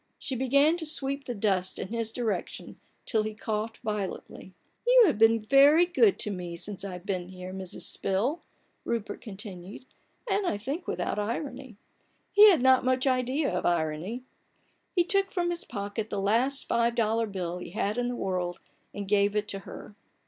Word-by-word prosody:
She 265 - -4
began 280 +6 +3
to 330 - -5
sweep 275 -2 0
the 245 - -4
dust 195 -3 0
in 185 - -5
his 230 -1 -2
direction 225 -6 -4 0.3
till 220 -4 +1
he 215 0 -4
coughed 215 +1 -3
violently. 210 -3 -4
M 185 - -16 0.3
You - - +8
have 300 - +1
been 225 0 +5
very 280 +9 +6
good 390 +3 +3
to 210 - -1
me 175 -3 -5
since 200 +3 -6
I've 180 -2 -7
been 185 -3 -3
here, 185 0 -8
Mrs. 190 -1 -5
Spill," 230 - 0 0.4
Rupert 220 -3 -3
continued; 195 +1 -8 0.4
and, 395 -2 0
I 205 - 0
think, 280 - -5
without - - -2
irony: 245 +1 -4 0.5
he 420 +1 +9
had 325 -10 +3
not 260 -1 +5
much 255 +1 +1
idea 260 +2 +1
of 180 - -1
irony. 170 +8 -1 0.7
He 350 - +4
took 395 +1 +1
from 345 -2 0
his 345 - -1
pocket 205 0 -4
the - - -3
last 235 +8 +2
five 235 0 +1
dollar 225 0 +1
bill 180 -3 -4
he - - -8
had 210 +4 -2
in 245 - 0
the 245 - -3
world 180 -4 -2 0.4
and 200 -1 -5
gave 200 0 +2
it 210 0 0
to 195 - -3
her. 210 - -11
225 Hz, 180 wpm, -28 LUFS, 195-270 Hz, 0.7 s, he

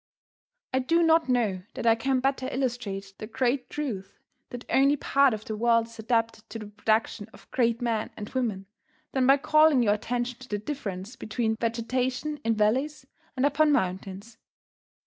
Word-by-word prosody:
I 260 - +3
do 330 +6 +2
not 325 -3 +4
know 220 -7 +1
that - - -5
I 230 - +6
can 255 +3 0
better 265 -1 0
illustrate 230 -7 -3
the 215 - -6
great 250 +2 -1
truth 210 -10 -5 0.3
that 245 0 -8
only 275 +2 +4
part 275 -1 +3
of 215 -1 -5
the 220 - -4
world 230 +1 +3
is 230 0 -15
adapted 225 -1 -1
to 220 - -6
the 215 - -7
production 215 0 -1
of - - -18
great 235 -1 +1
men 225 -3 -1
and 210 -1 -6
women 220 -7 -2 0.5
than 260 -2 +1
by 275 +1 +7
calling 305 -2 +4
your 205 -2 +3
attention 240 +3 -3
to 260 - -13
the 210 - -1
difference 210 -3 -5
between 220 -2 -2
vegetation 250 +6 -2
in 225 0 +1
valleys 260 +8 0 0.3
and 260 - +2
upon 295 +1 +3
mountains. 195 +1 -2
235 Hz, 170 wpm, -27 LUFS, 215-265 Hz, 0.5 s, by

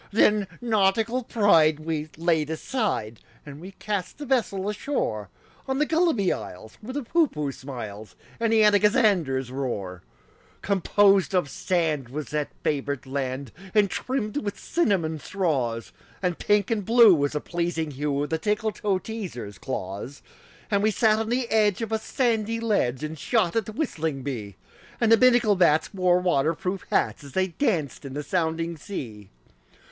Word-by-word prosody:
Then 210 -1 +3
nautical 225 +2 +2
pride 165 -10 +4
we 155 -1 -3
laid 160 -2 +1
aside, 160 - -2 0.3
And 145 +1 -10
we 190 +2 -9
cast 195 -2 -4
the 295 - -6
vessel 220 -7 0
ashore 205 - -2 0.4
On 265 0 -1
the 300 - +2
Gulliby 315 - +2
Isles, 105 +1 -9
where 240 +4 -7
the 290 - -2
Poohpooh 225 - 0
smiles, 110 -8 -8 0.2
And 230 -1 +1
the 220 -1 +5
Anagazanders 205 - +3
roar. 100 -9 -4 0.6
Composed 195 0 +3
of 175 -7 +1
sand 160 -8 -1
was 145 +2 -5
that 150 0 -2
favored 140 -2 -1
land, 130 -1 -3 0.2
And 205 -2 +4
trimmed 255 -2 -2
with 205 -7 -3
cinnamon 180 - 0
straws; 135 -12 -2 0.3
And 180 -2 -1
pink 205 0 +2
and 215 -3 0
blue 230 0 +7
was 145 -3 +1
the 150 - -1
pleasing 170 -2 -2
hue 145 +1 -1
Of 145 - -5
the 160 - 0
Tickletoeteaser's 205 - -3
claws. 100 +4 -6 0.5
And 200 -1 +2
we 215 - +3
sat 215 +1 +3
on 225 0 -2
the 245 0 0
edge 215 -1 +2
of 225 - -5
a 220 - +1
sandy 230 -1 0
ledge 175 - 0
And 155 0 -5
shot 215 - +1
at 225 -3 0
the - - -5
whistling 160 - -3
bee; 110 -8 -5 0.4
And 230 -2 +2
the 225 - +8
Binnacle 240 -4 +5
bats 165 -1 +3
wore 180 -2 +3
water 165 -3 +1
proof 185 +3 -4
hats - - 0
As 140 -2 -12
they 185 0 +1
danced 170 - -1
in 135 -1 -7
the 150 - -3
sounding 165 0 -1
sea. 115 - -7
180 Hz, 160 wpm, -25 LUFS, 140-215 Hz, 0.6 s, the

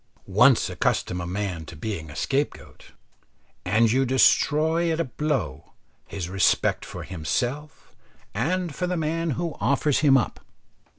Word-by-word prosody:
Once 115 +6 +4
accustom 90 0 -1
a 85 - -5
man 90 -3 -3
to 80 - -11
being 80 -2 -5
a 75 - -10
scapegoat, 140 - -3 0.8
and 110 +4 +3
you 130 +3 +3
destroy 155 +5 +3
at 160 - -1
a - - +2
blow 130 - -3 0.3
his 95 -4 -5
respect 95 +1 +1
for - - -8
himself 125 - -4 0.4
and 170 - -1
for 180 +5 -2
the 180 0 -1
man 165 +1 -1
who 170 -2 -3
offers 140 +1 +2
him 140 -3 +5
up. 120 - -2
130 Hz, 140 wpm, -25 LUFS, 95-155 Hz, 0.8 s, him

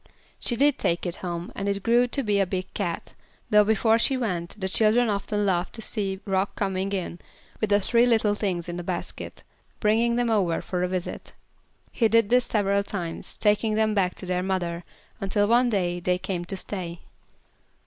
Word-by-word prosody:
She 240 - 0
did 285 +3 +3
take 170 +2 0
it 175 - -3
home, 175 -1 -5
and 200 +1 -2
it 200 -1 -2
grew 240 +1 +4
to 275 +3 -1
be 205 -3 +1
a 195 - +2
big 185 0 -4
cat; 175 -5 -3 0.4
though 210 0 +7
before 220 +2 +3
she 265 +3 +2
went, 185 -5 -3
the 190 - -1
children 220 +4 +3
often 205 +1 -1
laughed 180 -2 0
to 225 - -5
see 195 -4 -1
Rock 195 0 0
coming 195 -1 -1
in 180 -3 -3 0.4
with 215 - 0
the 205 0 +4
three 235 +4 +3
little 220 -3 +3
things 185 -5 -2
in 175 0 -4
a - - -5
basket, - - -5 0.4
bringing 230 +2 +2
them 240 -1 +1
over 185 -6 +2
for 180 -1 -3
a 180 - +1
visit. 180 -1 -5 0.6
He 230 - +2
did 230 -1 +3
this 250 0 +4
several 200 -2 +1
times, 175 -5 -5
taking 210 +1 +2
them 215 0 +2
back 185 -3 +1
to - - -8
their 180 0 -1
mother, 180 -2 -2 0.4
until 205 +1 +1
one 240 +2 +4
day 175 -5 0
they 180 +1 +1
came 180 -1 -4
to 195 +2 -5
stay. 175 -3 -5
200 Hz, 195 wpm, -25 LUFS, 180-220 Hz, 0.6 s, though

